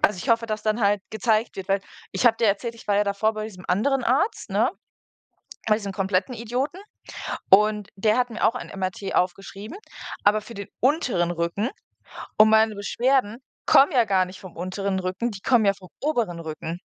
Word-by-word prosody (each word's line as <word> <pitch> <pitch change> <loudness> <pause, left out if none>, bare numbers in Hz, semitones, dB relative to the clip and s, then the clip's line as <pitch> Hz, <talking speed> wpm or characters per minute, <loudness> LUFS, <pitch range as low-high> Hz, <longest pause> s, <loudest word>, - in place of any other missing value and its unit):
also 205 - +3
ich - - -6
hoffe, 230 0 +3
dass 215 -1 -3
dann 215 +2 0
halt 200 -2 +2
gezeigt 220 +1 0
wird 195 0 -7
weil 195 0 +2 0.3
ich - - -2
habe 225 -2 +5
dir 225 - +2
erzählt, 230 +4 0
ich 230 - -15
war 200 -1 +2
ja 205 - +3
davor 205 +2 0
bei 215 - -4
diesem 190 -4 -10
anderen 245 +7 +1
Arzt, 280 - 0
ne, - - +2 1.0
bei 215 - +4
diesem 200 -3 -5
kompletten 190 +4 -1
Idioten, 250 - -3 0.7
und 210 +1 +4
der 215 +3 +2
hat 250 -1 +1
mir 225 - -6
auch 230 - +2
ein - - -6
MRT 185 +1 -3
aufgeschrieben, 195 - -2 0.5
aber 210 +1 +4
für 220 +3 -11
den 200 0 -7
unteren 245 - +1
Rücken, 170 +7 -1 0.7
und 215 0 +8
meine 220 0 +4
Beschwerden 235 +2 0 0.3
kommen 280 +4 +6
ja 245 -3 +4
gar 190 -3 +2
nicht 185 +1 -11
vom 185 -3 -12
unteren 190 +2 -2
Rücken, 185 +6 -2
die 200 -3 -9
kommen 240 -1 +3
ja 200 - +4
vom 185 -2 -15
oberen 230 - -1
Rücken. 160 +2 -6
210 Hz, 195 wpm, -24 LUFS, 195-230 Hz, 1.0 s, und